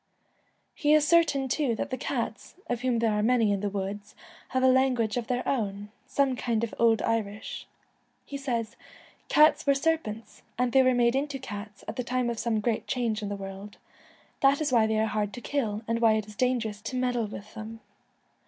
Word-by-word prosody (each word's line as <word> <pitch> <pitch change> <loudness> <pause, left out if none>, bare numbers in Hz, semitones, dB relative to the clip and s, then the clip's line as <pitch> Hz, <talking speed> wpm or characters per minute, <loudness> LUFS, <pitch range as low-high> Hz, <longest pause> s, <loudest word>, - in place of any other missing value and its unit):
He 300 -1 +3
is 300 -1 +3
certain 320 -6 +3
too 255 -2 0
that - - -4
the - - 0
cats, - - -4
of 245 -1 -3
whom 250 -2 +1
there 230 -1 +2
are 210 0 +1
many 225 -1 +3
in 200 - 0
the 205 +1 -1
woods, 200 +1 -5 0.3
have 260 0 -1
a - - +6
language 255 -4 +3
of 240 -2 -2
their 250 0 -2
own 205 -4 -2
— - - -39
some 275 -2 +3
kind 230 -2 -1
of 230 - -3
old 230 -1 +4
Irish. 215 -2 -3 0.6
He 285 - -8
says, 235 -5 -3 0.5
'Cats 300 0 +5
were 280 - +5
serpents, 275 -8 -2 0.2
and 250 0 +1
they 265 - +6
were 255 -1 +3
made 240 0 +3
into 280 0 -1
IOI - - -16
The - - -8
ca 205 -1 -4
t - - -21
s 200 - -21
at - - -5
the 250 - -1
time 250 0 0
of 230 - -5
some 225 -3 0
great 225 0 -1
change 235 -4 -1
in 205 - -3
Twilight, 200 0 -4
the 195 - -8 0.2
world. 205 +1 -11 0.6
That 275 +1 +4
is 305 -3 -1
why 225 -3 +4
they 220 0 0
are 220 - +2
hard 210 -1 -2
to - - -6
kill, 230 -6 -2
and 230 0 0
why 225 -1 +5
it 215 -1 0
is 210 0 -13
dangerous 230 -4 0
to 225 +4 -5
meddle 245 -3 0
with 205 0 -9
them. 225 +1 -8
235 Hz, 225 wpm, -28 LUFS, 215-260 Hz, 0.6 s, a